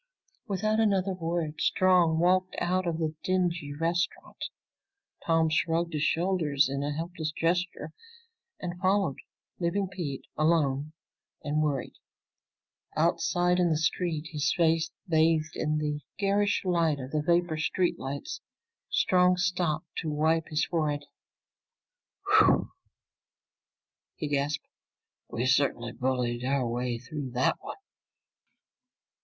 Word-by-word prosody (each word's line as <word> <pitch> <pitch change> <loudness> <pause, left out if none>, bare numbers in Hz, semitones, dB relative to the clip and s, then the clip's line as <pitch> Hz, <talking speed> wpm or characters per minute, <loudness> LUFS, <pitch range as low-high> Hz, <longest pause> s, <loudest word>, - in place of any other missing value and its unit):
Without 215 +2 0
another 195 -3 +2
word 165 -3 -3
Strong 180 -3 +4
walked 185 +2 +2
out 180 +1 0
of 165 -2 -1
the 160 -2 -1
dingy 175 -5 0
restaurant. 165 +4 -2 0.8
Tom 165 -1 +4
shrugged 165 +1 0
his 150 - -1
shoulders 160 -3 +2
in 140 +1 -3
a 145 +1 -1
helpless 160 0 -4
gesture 165 -1 -1 0.7
and 175 -1 -5
followed, 190 -5 +1 0.4
leaving 185 +3 0
Pete 170 -8 -5
alone 155 -2 +1 0.5
and 150 +1 0
worried. 145 -3 -1 1.0
Outside 180 0 +2
in 175 -1 +3
the 155 - +2
street, 160 0 -1
his 150 -2 0
face 165 -1 +3 0.2
bathed 160 -2 +2
in 155 0 0
the 150 -1 -2 0.2
garish 205 0 +1
light 165 -5 +2
of 130 0 -7
the 155 - 0
vapor 170 0 +1
street 175 +3 0
lights, 140 +2 -5 0.5
Strong 180 0 +3
stopped 180 -2 -1
to 160 - -2
wipe 160 +2 +1
his 155 0 0
forehead. 150 -4 -1 1.2
"Whew!" - - +4 1.4
he 150 - -4
gasped. 145 +1 -1 0.6
"We 120 - -2
certainly 130 -2 +2
bulled 125 -2 -1
our 135 -1 +1
way 120 0 -2
through 140 +2 -6
that 125 - +2
one!" - - -8
160 Hz, 120 wpm, -28 LUFS, 150-180 Hz, 1.4 s, Strong